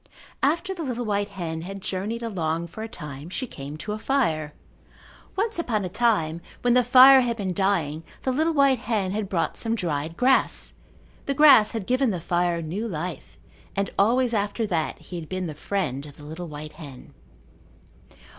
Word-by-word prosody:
After 335 +7 +1
the 350 - -7
little 245 -5 -3
white 205 -1 0
hen 165 -4 -5
had 195 +3 -7
journeyed 200 +5 -4
along 170 -6 -2
for 170 +6 -9
a 220 - -4
time 150 - -8
she 255 +8 -3
came 145 - -8
to 210 - -6
a 215 - -3
fire. 165 - 0 0.8
Once 435 0 -1
upon 220 - -1
a - - -4
time, 175 -7 +1 0.2
when 245 -1 +4
the 250 0 +5
fire 260 +2 +8
had 235 -2 -1
been 190 -4 -2
dying 175 -6 0 0.2
the 260 - +1
little 315 +5 +1
white 275 -3 +4
hen 215 -6 -1
had 205 -1 -3
brought 180 -5 -1
some 230 0 +1
dried 165 -5 -3
grass. 265 +1 +4 0.5
The 275 - 0
grass 265 -8 +7
had 220 -4 -3
given 255 +2 +2
the 185 -5 -2
fire 175 0 0
new 190 +9 -3
life 180 -2 -6 0.4
and 200 0 -1
always 240 +4 +3
after 210 +2 0
that 165 -6 -1
he 175 - -8
had 155 - -10
been 185 0 -3
the 160 - -4
friend 150 -4 -3
of 145 - -14
the 150 - -13
little 160 +3 -7
white 150 0 -8
hen. 145 -5 -12
200 Hz, 185 wpm, -25 LUFS, 165-245 Hz, 0.8 s, fire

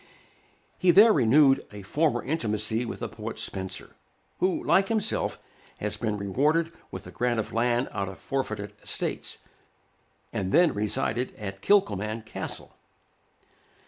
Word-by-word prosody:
He 185 - +3
there 210 +5 +8
renewed 135 +1 +5
a 105 -1 -9
former 150 +10 +1
intimacy 110 -5 0
with - - -6
the - - -2
poet - - -7
Spenser, 95 -1 -4 0.4
who, 185 0 +1
like 190 +3 +4
himself, 220 -1 0 0.4
had - - -2
been 105 -1 -1
rewarded 150 - +1 0.2
with - - -7
a - - -9
grant 120 -1 0
of 110 - -4
land 120 +2 +1
out 100 -1 -2
of 95 - -9
forfeited 110 -7 -3
estates, - - -3 1.0
and 95 -1 -2
then 170 0 +5
resided 110 +4 -1
at 100 -2 -7
Kilcolman 110 - +2
Castle. 110 - -6
120 Hz, 135 wpm, -27 LUFS, 105-160 Hz, 1.0 s, there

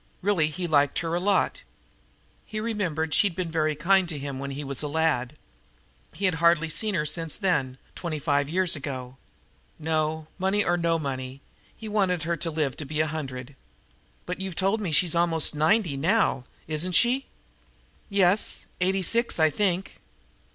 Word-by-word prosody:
Really 185 -6 +2
he 160 +4 -4
liked 145 -4 +2
her 165 - -2
a 175 - +1
lot. 195 +2 +1 0.8
He 215 - -6
remembered 180 -9 -2
she'd 200 -5 +3
been 180 -3 -3
very 155 -1 0
kind 180 +4 +3
to 155 - -2
him 140 -1 -5
when 140 0 -4
he 140 +2 -5
was 140 -1 -1
a 150 - -2
lad. 150 -3 0 0.8
Had 190 -3 +2
hardly 170 -1 +4
seen 210 +5 -1
her 150 -3 0
since 160 +1 -3
then 135 -10 0 0.2
twenty 170 -3 -4
five 145 -1 0
years 180 +1 +2
ago. 130 -3 -6 0.6
No, 160 0 -1
money 195 +2 +2
or 175 - +1
no 170 -1 +1
money, 130 -3 -5 0.4
he 220 - -8
wanted 190 -6 +1
her 170 +1 -1
to 165 - -3
live 150 -5 -1
to 150 - -6
be 150 +2 -4
a 155 - +3
hundred. 135 -4 -6 0.7
"But 180 +1 -5
you've 190 -3 -5
told 195 +5 +1
me 185 -5 -2
she's 165 +2 +3
almost 170 -2 +3
ninety 160 +2 +2
now! 160 - +1 0.2
Isn't 160 +4 -1
she?" 250 +7 +3 0.8
"Yes, 200 0 +2 0.2
eighty 190 +1 +2
six, 235 +2 +2
I 155 -1 +4
think." 190 +2 -1
165 Hz, 170 wpm, -26 LUFS, 150-185 Hz, 0.8 s, hardly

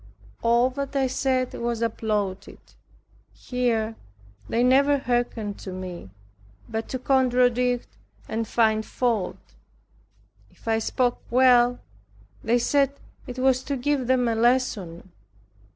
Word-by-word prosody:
All 235 +2 +3
that 280 +1 -5
I 270 -1 +2
said 260 -1 0
was 235 -1 -2
applauded. 210 -4 -2 0.8
Here 230 -3 -1 0.5
they 235 - +1
never 280 +3 +4
hearkened 240 -5 -2
to 190 - -7
me, 185 - -7 0.6
but 220 0 -4
to 260 - -2
contradict 250 -1 +2 0.4
and 225 0 -3
find 220 -1 +2
fault. 230 -5 -1 1.1
If - - -22
I 225 0 +2
spoke 245 +2 0
well, 245 0 +5 0.7
they 235 +2 +2
said 275 +3 +2 0.3
it 250 0 -7
was 260 0 +2
to 280 -2 -2
give 270 -1 -1
them 255 -1 +2
a 230 - +1
lesson. 225 -7 0
245 Hz, 120 wpm, -25 LUFS, 225-255 Hz, 1.1 s, well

